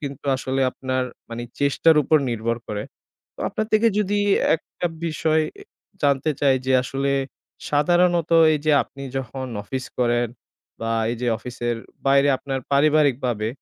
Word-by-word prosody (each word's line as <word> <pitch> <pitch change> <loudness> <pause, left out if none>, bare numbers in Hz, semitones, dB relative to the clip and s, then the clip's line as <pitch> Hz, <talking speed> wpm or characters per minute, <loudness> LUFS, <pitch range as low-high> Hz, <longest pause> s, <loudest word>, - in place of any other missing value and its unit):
কিন্তু 140 -2 -7
আসলে 130 +1 -2
আপনার 130 0 -2 0.3
মানে 115 +1 -5 0.2
চেষ্টার 145 +3 +4
উপর 155 +2 +4
নির্ভর 115 0 -1
করে। 105 -1 -3 0.7
আপনার 215 - -2
থেকে 215 +2 +5
যদি 205 0 +1 0.4
একটা 175 +2 -5 0.2
বিষয় 155 0 +1 0.2
এ - - -10 0.4
জানতে 140 +1 +2
চাই, 135 -2 +4
যে 130 - +2
আসলে 135 +2 -1 0.6
সাধারণত 175 +3 +2 0.2
এই - - 0
যে 155 - +4
আপনি 140 - -12 0.2
যখন 130 +1 -5 0.2
অফিস 130 +4 -4
করেন 120 0 +2 0.5
বা 115 - -2 0.2
এই 120 - -3
যে - - 0
অফিসের 120 -1 -3 0.3
বাইরে 140 +1 +5
আপনার 135 -1 -4
পারিবারিক 145 -2 +4
ভাবে 110 -3 -1
140 Hz, 145 wpm, -23 LUFS, 125-155 Hz, 0.7 s, থেকে